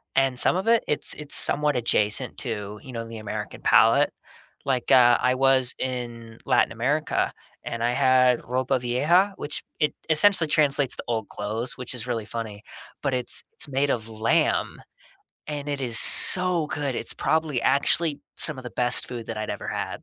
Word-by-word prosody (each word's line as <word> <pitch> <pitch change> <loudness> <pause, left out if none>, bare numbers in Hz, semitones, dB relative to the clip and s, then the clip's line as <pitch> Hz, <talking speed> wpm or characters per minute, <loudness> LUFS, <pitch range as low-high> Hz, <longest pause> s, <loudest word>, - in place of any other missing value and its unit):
And 135 -2 +2
some - - +4
of 190 +4 -3
it, 230 -1 +3
it's 150 - 0
it's 150 -1 -5
somewhat 150 -1 +2
adjacent 115 0 0
to, 105 -4 -6
you 130 - -11
know, 115 -1 -5
the 115 0 -9
American 110 -2 -7
palate. - - +3 0.5
Like, 130 -2 -2
uh, 120 -2 +6
I 125 0 +1
was 130 -1 +1
in 120 -3 -6
Latin - - +2
America 140 +7 -2 0.3
and 115 0 -5
I 120 - +1
had 125 -1 +3
Ropa 130 +2 -2
Vieja, 155 +11 +1
which 145 - -6 0.2
it 150 - 0 0.2
essentially 165 +2 +3
translates 145 -3 +1
to - - -8
old 115 -3 -3
clothes, 110 +4 -5
which 125 0 -4
is 125 0 -7
really 115 -3 -3
funny, 110 -2 -7 0.4
but 140 -2 -1
it's 125 -1 0
it's - - -3
made 140 +1 -1
of 110 -2 -3
lamb 110 +1 -1 0.7
and 145 -1 -6
it 140 -1 -3
is 120 -3 +1
so 180 +1 +8
good. 145 -3 -4
It's - - -4
probably 155 -5 -1
actually 145 +3 +1 0.2
some 155 -3 +2
of 130 - -10
the 125 - -7
best 125 +1 -1
food 120 -2 -8
that 115 - -6
I'd 110 - -5
ever - - -7
had. - - -5
130 Hz, 180 wpm, -24 LUFS, 115-145 Hz, 0.7 s, so